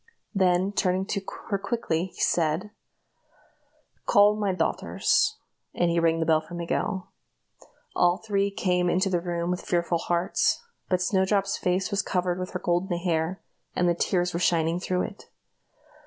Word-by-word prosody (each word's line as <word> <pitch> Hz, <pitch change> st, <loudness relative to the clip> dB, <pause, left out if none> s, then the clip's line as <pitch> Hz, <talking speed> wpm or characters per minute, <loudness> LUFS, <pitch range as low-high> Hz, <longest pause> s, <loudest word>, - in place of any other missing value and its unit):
Then, 185 Hz, -1 st, +2 dB
turning 190 Hz, -1 st, +1 dB
to 200 Hz, -, -1 dB, 0.3 s
her 200 Hz, -2 st, 0 dB
quickly, 190 Hz, -7 st, -1 dB
he -, -, -7 dB
said: 170 Hz, +5 st, +1 dB, 1.4 s
"Call 205 Hz, +1 st, +6 dB
my 205 Hz, -2 st, 0 dB
daughters;" 430 Hz, -, +1 dB, 0.4 s
and 175 Hz, -1 st, +2 dB
he 170 Hz, -, +2 dB
rang 165 Hz, -1 st, +2 dB
the 160 Hz, -, 0 dB
bell 160 Hz, -1 st, +3 dB
for 175 Hz, +2 st, -10 dB
Miguel. 170 Hz, +2 st, -2 dB, 0.8 s
All 175 Hz, 0 st, +3 dB
three 200 Hz, -2 st, 0 dB
came 180 Hz, -3 st, 0 dB
into 185 Hz, +2 st, +1 dB
the 175 Hz, -2 st, +1 dB
room 170 Hz, 0 st, -2 dB
with 180 Hz, -, -2 dB
fearful 170 Hz, -1 st, 0 dB
hearts; 175 Hz, -, +1 dB, 0.3 s
but 180 Hz, -1 st, +1 dB
Snowdrop's 195 Hz, +1 st, +1 dB
face 185 Hz, +3 st, 0 dB
was 200 Hz, -1 st, +1 dB
covered 180 Hz, -2 st, -1 dB
with 185 Hz, 0 st, -4 dB
her 180 Hz, -, -2 dB
golden 175 Hz, 0 st, 0 dB
hair, 170 Hz, +1 st, -1 dB, 0.3 s
and 180 Hz, -, +2 dB
the 175 Hz, -, +4 dB
tears 175 Hz, +1 st, 0 dB
were 170 Hz, -, -1 dB
shining 170 Hz, -1 st, +2 dB
through 180 Hz, 0 st, -1 dB
it. 205 Hz, -, -8 dB
180 Hz, 155 wpm, -26 LUFS, 170-195 Hz, 1.4 s, Call